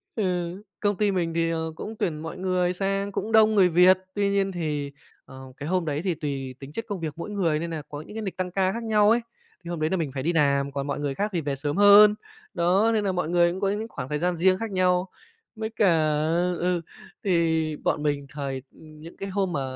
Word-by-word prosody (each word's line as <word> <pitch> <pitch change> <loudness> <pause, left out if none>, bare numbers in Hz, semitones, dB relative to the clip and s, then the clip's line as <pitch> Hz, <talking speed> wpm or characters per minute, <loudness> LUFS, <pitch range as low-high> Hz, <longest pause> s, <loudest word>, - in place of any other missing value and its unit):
ừ, 215 - -1 0.6
công 205 -2 0
ty 210 -1 +2
mình 170 -3 -1
thì, 165 0 +1
ờ, 160 0 -2
cũng 220 +5 -7
tuyển 155 -4 -1
mọi 160 +3 -7
người 180 -1 0
sang 195 +1 -1
cũng 220 +3 -3
đông 220 -1 +5
người 185 -3 +5
Việt. 180 +2 +6 0.2
Tuy 200 -1 +1
nhiên 195 -1 +1
thì, 150 -5 -3 0.3
ờ, 130 -1 -12
cái 145 +3 -5
hôm 180 -2 +1
đấy 150 0 -2
thì 180 -4 0
tùy 135 -4 -4
tính 135 +1 -10
chất 225 +7 -5
công 200 -4 -4
việc 155 -3 -4
mỗi 170 - -6
người 170 -7 0
nên 170 +1 -4
nà 160 -2 -4
có 145 0 -6
những 210 - -12
cái 220 - -3
nịch 195 -3 -5
tăng 180 -1 -2
ca 190 0 +1
khác 230 0 -5
nhau 210 -2 +3
ấy. 235 - +4 0.4
Thì 170 - -8
hôm 170 -2 -3
đấy 155 +1 +1
là 190 - 0
mình 155 -5 -2
phải 130 - -4
đi 170 - +1
làm, 140 -2 +2
còn 140 0 -4
mọi 145 - -2
người 140 -2 -2
khác 210 +1 -1
thì 170 - 0
về 140 -1 -2
sớm 145 +5 -3
hơn. 205 +1 +8 0.4
Đó, 190 +6 +3
nên 215 -1 +1
nà 195 - +1
mọi 180 -3 -2
người 170 0 +3
cũng 185 - -5
có 195 - +2
những 215 +3 -2
khoảng 130 - -6
thời 150 0 -1
gian 175 0 0
riêng 185 +2 +3
khác 225 -1 -5
nhau. 185 0 +1 0.5
Với 220 0 -4
cả 215 -3 +2
ờ, 160 +3 +1
ừ, 180 -1 0 0.4
thì 160 -4 +1
bọn 150 - 0
mình 145 -1 -1
thời 135 -3 -4
ừm, 155 -1 -16
những 165 - -11
cái 195 - -5
hôm 190 -2 -1
mà 140 - -1
175 Hz, 255 wpm, -25 LUFS, 155-195 Hz, 0.6 s, hơn